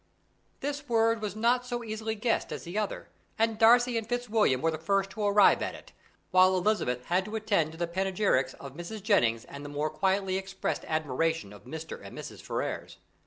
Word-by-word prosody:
This 290 0 -4
word 230 -1 +3
was 210 -2 -3
not 240 +3 +2
so 240 -1 -4
easily 220 0 -3
guessed 225 +2 0
as - - -5
the 175 +2 -8
other, 210 -1 -2 0.3
and 225 -1 +1
Darcy 240 +1 +5
and 225 - -9
Fitzwilliam 225 - +2
were 165 +3 +1
the 155 - -4
first 195 +3 0
to 215 - -4
arrive 205 0 +5
at - - -3
it, - - -14 0.4
while 185 0 +5
Elizabeth 175 - 0
had 180 +2 +1
to 210 +1 -6
attend 200 -8 +1
to - - -11
the 170 - 0
panegyrics 185 -7 0
of 140 -1 -10
Mrs. 175 +6 -7
Jennings 120 - +2
and 140 0 -9
the 145 - -7
more 150 +1 -2
quietly 190 +3 +1
expressed 195 0 -3
admiration 155 -5 -1
of 105 - -14
Mr. 160 +5 -7
and - - -10
Mrs. - - -8
Ferrars. - - -4
195 Hz, 195 wpm, -29 LUFS, 160-220 Hz, 0.4 s, Darcy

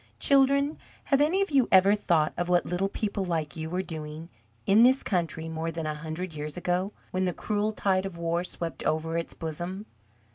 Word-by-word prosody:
Children, 280 +2 +3 0.2
have 275 0 +2
any 355 +7 +3
of 390 - -6
you 270 -4 +4
ever 190 +1 +6
thought 170 -7 +1
of 175 0 -2
what 175 0 +3
little 180 +3 -1
people 205 -1 -2
like 165 -3 -2
you 160 -1 -5
were 180 +2 -1
doing 160 -1 -7 0.4
in 205 +3 +5
this 260 +3 +5
country 165 -4 -1
more 160 0 -3
than 165 -1 -4
a 155 - -1
hundred 160 +3 -5
years 150 +2 -5
ago, 180 +3 -1 0.2
when 185 0 0
the 180 - 0
cruel 210 +3 -1
tide 195 -2 0
of 180 -3 -9
war 170 +1 -1
swept 170 -2 -5
over 160 +1 -1
its 170 0 -3
bosom? 175 +5 -5
180 Hz, 195 wpm, -27 LUFS, 165-205 Hz, 0.4 s, ever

